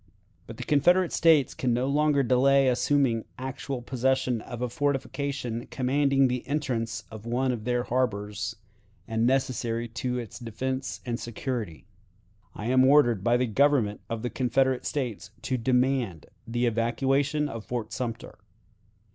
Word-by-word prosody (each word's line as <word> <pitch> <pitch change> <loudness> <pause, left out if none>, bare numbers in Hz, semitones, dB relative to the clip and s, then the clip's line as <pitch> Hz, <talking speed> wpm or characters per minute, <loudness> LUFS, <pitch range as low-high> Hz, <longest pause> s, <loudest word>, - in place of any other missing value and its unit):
"But 115 - -9
the - - -5
Confederate 175 +7 +3
States 160 -5 +4
can 125 -2 0
no 125 +2 0
longer 145 0 +2
delay 135 +2 +4
assuming 125 -2 +2
actual 130 0 -5
possession 130 -1 0
of 120 +2 -6
a - - +1
fortification 135 -2 -2
commanding 135 +1 +2
the 125 -1 -2
entrance 115 -6 -2
of 110 +1 -9
one 125 +2 +1
of 115 -3 -5
their 120 0 +1
harbors, 105 -4 -2 0.5
and 115 0 +1
necessary 120 -3 0
to 125 +2 -3
its 120 -1 -6
defense 130 +3 -4
and 120 -1 -2
security. 115 - -5 0.7
"I 105 - -6
am 130 +2 +4
ordered 130 -7 +4
by 120 +2 +3
the 125 - +1
Government 125 -3 +2
of 115 0 -4
the 125 - -2
Confederate 130 0 +1
States 125 -8 -3
to 130 +3 -1
demand 125 - 0 0.2
the 120 +1 0
evacuation 135 +6 +1
of 115 -5 -6
Fort 120 -2 -4
Sumter. 115 -2 -5
125 Hz, 145 wpm, -27 LUFS, 115-135 Hz, 0.7 s, States